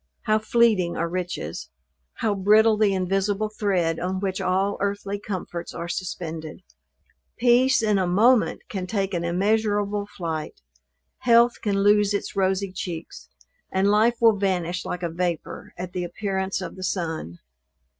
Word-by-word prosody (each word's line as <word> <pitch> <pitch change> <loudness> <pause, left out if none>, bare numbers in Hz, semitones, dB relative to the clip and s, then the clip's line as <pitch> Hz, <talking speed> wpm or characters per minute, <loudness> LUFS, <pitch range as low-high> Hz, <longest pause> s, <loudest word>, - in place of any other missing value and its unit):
how 215 -1 +2
fleeting 215 -6 +2
are 165 - 0
riches! 175 - -4 0.5
how 215 -2 0
brittle 215 +3 +4
the 210 -1 +3
invisible 195 +3 0
thread 185 -6 0
on 185 +2 -2
which 190 -1 -2
all 195 +2 +1
earthly 200 0 -2
comforts 185 -4 -6
are 170 0 -4
suspended! 165 -2 -5 0.7
Peace 245 +1 +4
in 210 -2 +2
a 185 - +1
moment 220 +7 +3
can 190 -6 -4
take 195 -1 -1
an 170 -1 -1
immeasurable 205 +3 0
flight; 165 - -5 0.6
health 235 0 +4
can 200 -2 0
lose 205 0 +4
its 200 - -4
rosy 190 0 0
cheeks; 175 -3 -7 0.4
and 195 +2 +2
life 220 +3 +4
will 225 -3 +5
vanish 180 -2 -1
like 180 0 -4
a - - +1
vapor 175 0 -4
at 180 0 -6
the 180 - -2
appearance 190 +1 -2
of - - -6
the 185 - -8
sun! 160 - -3
195 Hz, 145 wpm, -24 LUFS, 180-210 Hz, 0.7 s, will